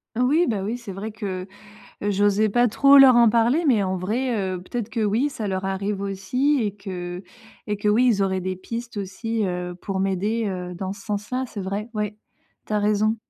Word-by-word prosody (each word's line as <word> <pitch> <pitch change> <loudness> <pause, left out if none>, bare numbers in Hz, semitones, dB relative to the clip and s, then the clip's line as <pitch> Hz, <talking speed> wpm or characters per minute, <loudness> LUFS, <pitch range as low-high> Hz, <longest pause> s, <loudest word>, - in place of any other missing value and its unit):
Oui, 275 +9 +3
bah 210 -6 -1
oui, 220 +5 -2
c'est 210 -5 -8
vrai 205 +4 -5
que, 195 -4 -5 0.6
heu, 205 - 0
j'osais 205 +2 +3
pas 240 +4 +3
trop 275 +5 +6
leur 265 -3 +8
en 235 -1 +7
parler, 235 +9 +3
mais 235 -7 +4
en 190 -1 -1
vrai, 230 +7 -1 0.2
heu, 180 - -6
peut-être 230 +3 -4
que 225 0 -3
oui, 225 +8 +1
ça 220 -7 -5
leur 190 0 -2
arrive 195 +1 -2
aussi 225 +9 0
et 205 -2 -1
que 180 -2 -6 0.4
et 210 - -1
que 205 +1 -1
oui 230 +5 +4
ils 215 -5 +3
auraient 190 -1 0
des 185 +1 -3
pistes 230 +5 -7
aussi, 215 +3 -2
heu, 180 -1 -3
pour 190 +2 -4
m'aider, 195 +4 0
heu, 180 -2 -4
dans 190 +1 -4
ce 200 0 -11
sens-là, 210 +5 -2
c'est 205 - -6
vrai. 200 +3 -4
Ouais, 210 -1 -2 0.5
tu - - -6
as 210 - +2
raison. 210 +1 +2
205 Hz, 210 wpm, -23 LUFS, 190-230 Hz, 0.6 s, leur